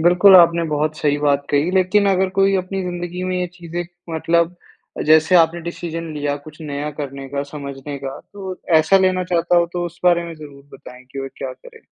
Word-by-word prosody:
बिल्कुल, 180 Hz, +3 st, +6 dB
आपने 170 Hz, -1 st, +5 dB
बहुत 155 Hz, +1 st, -1 dB
सही 145 Hz, -1 st, +1 dB
बात 145 Hz, -1 st, +1 dB
कही। 145 Hz, +5 st, +2 dB
लेकिन 190 Hz, +2 st, +3 dB
अगर 190 Hz, 0 st, +2 dB
कोई 195 Hz, 0 st, +4 dB
अपनी 190 Hz, +1 st, -3 dB
ज़िन्दगी 175 Hz, 0 st, -5 dB
में 185 Hz, 0 st, -1 dB
ये 180 Hz, -, -1 dB
चीज़ें 175 Hz, -1 st, -5 dB, 0.3 s
मतलब 170 Hz, +2 st, +1 dB, 0.4 s
अ, -, -, -1 dB
जैसे 155 Hz, +3 st, +4 dB
आपने 170 Hz, +1 st, +3 dB
डिसीज़न 165 Hz, -1 st, -6 dB
लिया 145 Hz, -1 st, -2 dB
कुछ 155 Hz, +1 st, -13 dB
नया 145 Hz, 0 st, -4 dB
करने 140 Hz, -1 st, -6 dB
का, 140 Hz, +1 st, -3 dB
समझने 140 Hz, -1 st, -7 dB
का 135 Hz, 0 st, -6 dB
तो 190 Hz, -2 st, -7 dB, 0.2 s
ऐसा 190 Hz, +5 st, +4 dB
लेना 185 Hz, -1 st, +1 dB
चाहता 175 Hz, 0 st, +1 dB
हो 170 Hz, -, +4 dB
तो 175 Hz, -1 st, -2 dB
उस 175 Hz, +1 st, -12 dB
बारे 175 Hz, -1 st, +4 dB
में 165 Hz, -1 st, -7 dB
ज़रूर 145 Hz, -3 st, -12 dB
बताएँ 125 Hz, 0 st, -13 dB
कि 140 Hz, -, -7 dB
वो 135 Hz, -, -5 dB
क्या 130 Hz, -, -4 dB
करें? -, -, -16 dB
170 Hz, 205 wpm, -20 LUFS, 145-180 Hz, 0.4 s, बिल्कुल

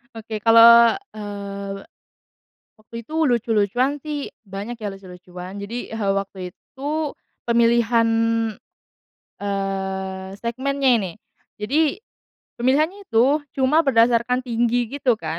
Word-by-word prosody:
Oke 220 Hz, -1 st, -6 dB
kalau, 230 Hz, +1 st, +7 dB, 0.2 s
eee, 200 Hz, -1 st, -6 dB, 1.0 s
waktu 215 Hz, +1 st, -20 dB
itu 315 Hz, +6 st, -1 dB
lucu-lucuan 240 Hz, +2 st, +1 dB
sih 295 Hz, -1 st, -5 dB, 0.2 s
banyak 200 Hz, +5 st, -6 dB
ya 215 Hz, -, -5 dB
lucu-lucuan 180 Hz, 0 st, -10 dB
jadi, 220 Hz, +5 st, -6 dB
eee, 215 Hz, -3 st, -1 dB
waktu 190 Hz, -2 st, -5 dB
itu 295 Hz, +3 st, -4 dB, 0.3 s
pemilihan, 235 Hz, 0 st, +3 dB, 1.3 s
eee, 190 Hz, -1 st, -3 dB
segmennya 265 Hz, +3 st, 0 dB
ini, 190 Hz, -5 st, -3 dB, 0.5 s
jadi, 305 Hz, -, +1 dB, 0.6 s
pemilihannya 305 Hz, +11 st, +1 dB
itu 280 Hz, +2 st, +2 dB, 0.2 s
cuma 300 Hz, +5 st, +3 dB
berdasarkan 240 Hz, -1 st, +3 dB
tinggi 240 Hz, -1 st, 0 dB
gitu 250 Hz, -6 st, +1 dB
kan, 160 Hz, 0 st, -4 dB
230 Hz, 100 wpm, -22 LUFS, 200-260 Hz, 1.3 s, kalau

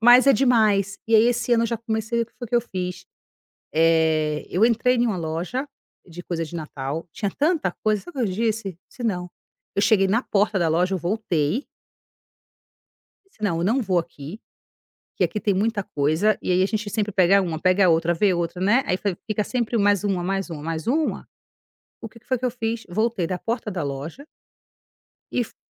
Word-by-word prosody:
mas 245 Hz, +3 st, +7 dB
é 275 Hz, -, +8 dB
demais. 210 Hz, -6 st, +2 dB
E 225 Hz, -, +2 dB
aí 220 Hz, 0 st, +7 dB
esse 240 Hz, 0 st, +1 dB
ano 230 Hz, -1 st, +4 dB
eu -, -, +1 dB
já 235 Hz, -, -2 dB
comecei, 220 Hz, +1 st, -2 dB
o -, -, -2 dB
que -, -, -32 dB
foi 240 Hz, -2 st, -6 dB
que 240 Hz, -, +2 dB
eu 235 Hz, -, +2 dB
fiz? 180 Hz, -5 st, -5 dB, 0.7 s
Eh, 160 Hz, -2 st, +2 dB
eu 205 Hz, +6 st, +4 dB
entrei 240 Hz, +2 st, +2 dB
em 240 Hz, 0 st, +2 dB
uma 215 Hz, -5 st, -1 dB
loja 175 Hz, -, -3 dB, 0.4 s
de 175 Hz, 0 st, -10 dB
coisa 170 Hz, -2 st, -3 dB
de 160 Hz, -, -11 dB
natal, 155 Hz, 0 st, -5 dB
tinha 200 Hz, +5 st, -3 dB
tanta 295 Hz, -, 0 dB
coisa, 215 Hz, -2 st, +1 dB
sabe 350 Hz, -6 st, -10 dB
o -, -, +1 dB
que -, -, 0 dB
eu -, -, -4 dB
disse? 215 Hz, -4 st, -2 dB
Disse: 250 Hz, -, -11 dB
"Não". 180 Hz, -6 st, -2 dB, 0.4 s
Eu -, -, +1 dB
cheguei 200 Hz, -1 st, +4 dB
na 220 Hz, +6 st, +1 dB
porta 205 Hz, -2 st, +1 dB
da 170 Hz, -2 st, +2 dB
loja, 175 Hz, +4 st, +1 dB
eu -, -, -1 dB
voltei 180 Hz, -, -1 dB, 1.6 s
Disse: 225 Hz, -, -21 dB
"Não, 175 Hz, -6 st, 0 dB
eu 170 Hz, -, -1 dB
não 230 Hz, +8 st, +2 dB
vou 185 Hz, -4 st, +1 dB
aqui, 170 Hz, +3 st, -7 dB, 0.8 s
que -, -, +2 dB
aqui 210 Hz, -, -2 dB
tem 200 Hz, -1 st, +1 dB
muita 210 Hz, +2 st, 0 dB
coisa". 160 Hz, +7 st, +1 dB
E -, -, -2 dB
aí, 180 Hz, +1 st, +3 dB
a -, -, +3 dB
gente 210 Hz, 0 st, -3 dB
sempre 210 Hz, 0 st, -1 dB
pega 190 Hz, +1 st, +5 dB
1, 165 Hz, -4 st, -3 dB
pega 185 Hz, +1 st, +4 dB
outra, 165 Hz, +1 st, +3 dB
vê 195 Hz, +3 st, +3 dB
outra, 170 Hz, +1 st, -3 dB
né, 210 Hz, +8 st, +3 dB
aí 180 Hz, -, +1 dB, 0.3 s
fica 215 Hz, -1 st, -1 dB
sempre 240 Hz, -1 st, -1 dB
mais 205 Hz, -1 st, +3 dB
1, 195 Hz, -3 st, 0 dB
mais 195 Hz, +1 st, -2 dB
1, 155 Hz, -3 st, -6 dB
mais 160 Hz, 0 st, -4 dB
1. 300 Hz, +6 st, 0 dB, 0.7 s
O 225 Hz, -, -7 dB
que 230 Hz, -, -17 dB
que -, -, -34 dB
foi 255 Hz, -1 st, 0 dB
que 250 Hz, -, -7 dB
eu 250 Hz, -, +2 dB
fiz, 230 Hz, -1 st, -3 dB
voltei 215 Hz, -1 st, 0 dB
da 180 Hz, +1 st, -3 dB
porta 225 Hz, +2 st, -3 dB
da 180 Hz, -4 st, -3 dB
loja 145 Hz, -, -6 dB, 1.1 s
e 245 Hz, -, +1 dB
fui -, -, -16 dB
200 Hz, 210 wpm, -23 LUFS, 175-230 Hz, 1.6 s, é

